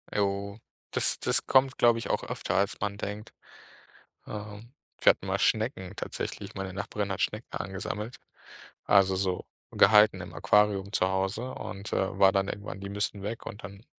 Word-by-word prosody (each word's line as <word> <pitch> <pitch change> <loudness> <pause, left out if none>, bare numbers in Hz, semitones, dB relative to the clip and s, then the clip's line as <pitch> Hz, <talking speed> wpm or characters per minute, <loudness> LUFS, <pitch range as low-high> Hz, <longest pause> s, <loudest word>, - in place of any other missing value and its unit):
Jo. 100 0 -1 0.3
Das - - +1
das - - +1
kommt, 130 0 +4
glaube 120 -1 +5
ich, 115 - -5
auch - - 0
öfter, - - -3
als 100 +1 +1
man 100 0 -2
denkt. 105 +1 -6 0.9
Ähm, 105 +2 -8 0.3
wir - - +7
hatten - - 0
mal - - 0
Schnecken 110 -4 0
tatsächlich, - - -5
meine 95 -1 -4
Nachbarin 100 +1 -3
hat 95 - -5
Schnecken 105 +3 -1
angesammelt. 100 +4 -4 0.7
Also, 95 -2 +5
so 95 -1 -1 0.3
gehalten 105 +1 +6
im - - -8
Aquarium 105 -1 +2
zu 95 - +3
Hause 95 +6 -1
und, 100 -1 -7
äh, 95 0 -1
war 95 -1 +6
dann 95 0 +1
irgendwann 100 -1 -6
die 100 - -6
müssen 100 0 -2
weg 110 +3 -5
und 105 -2 -7
dann 100 +2 -10
100 Hz, 165 wpm, -28 LUFS, 95-105 Hz, 0.9 s, wir